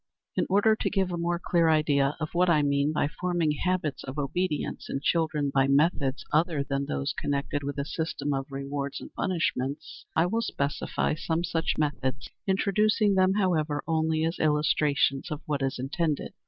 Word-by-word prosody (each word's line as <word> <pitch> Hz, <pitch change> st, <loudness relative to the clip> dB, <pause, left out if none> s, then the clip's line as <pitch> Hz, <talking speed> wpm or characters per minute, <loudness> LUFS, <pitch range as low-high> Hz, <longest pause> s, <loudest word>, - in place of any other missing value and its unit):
In -, -, +1 dB
order 205 Hz, +3 st, +4 dB
to -, -, -1 dB
give 190 Hz, -3 st, 0 dB
a -, -, -1 dB
more 170 Hz, 0 st, 0 dB
clear 170 Hz, -1 st, +2 dB
idea 145 Hz, -2 st, +2 dB
of 155 Hz, -1 st, -4 dB
what 180 Hz, +1 st, +3 dB
I 155 Hz, -3 st, +4 dB
mean 140 Hz, +1 st, +2 dB
by 150 Hz, -, +1 dB
forming 175 Hz, 0 st, 0 dB
habits 165 Hz, -2 st, -1 dB
of 130 Hz, +2 st, -7 dB
obedience 150 Hz, +3 st, -2 dB
in 135 Hz, -, -2 dB
children 155 Hz, -2 st, 0 dB
by 135 Hz, 0 st, +3 dB
methods 140 Hz, -1 st, +2 dB
other 155 Hz, -2 st, +2 dB
than 140 Hz, 0 st, -2 dB
those 70 Hz, 0 st, -2 dB
connected 145 Hz, 0 st, -2 dB
with 140 Hz, +1 st, -4 dB
a 140 Hz, -, -1 dB
system 145 Hz, -2 st, -2 dB
of 135 Hz, 0 st, -2 dB
rewards 140 Hz, 0 st, -4 dB
and -, -, -11 dB
punishments, 145 Hz, -6 st, -2 dB
I 165 Hz, -, +4 dB
will 225 Hz, +6 st, 0 dB
specify 140 Hz, -9 st, -1 dB
some 160 Hz, +2 st, -1 dB
such 165 Hz, -1 st, 0 dB
methods, 145 Hz, -2 st, -2 dB, 0.2 s
introducing 205 Hz, +2 st, +2 dB
them, 190 Hz, 0 st, +3 dB
however, 155 Hz, -7 st, +1 dB
only 160 Hz, -1 st, +1 dB
as 165 Hz, +2 st, -2 dB
illustrations 150 Hz, -2 st, +2 dB
of 150 Hz, -2 st, -4 dB
what 145 Hz, -2 st, -1 dB
is 135 Hz, 0 st, -1 dB
intended. 150 Hz, +4 st, -2 dB
155 Hz, 175 wpm, -27 LUFS, 140-175 Hz, 0.2 s, order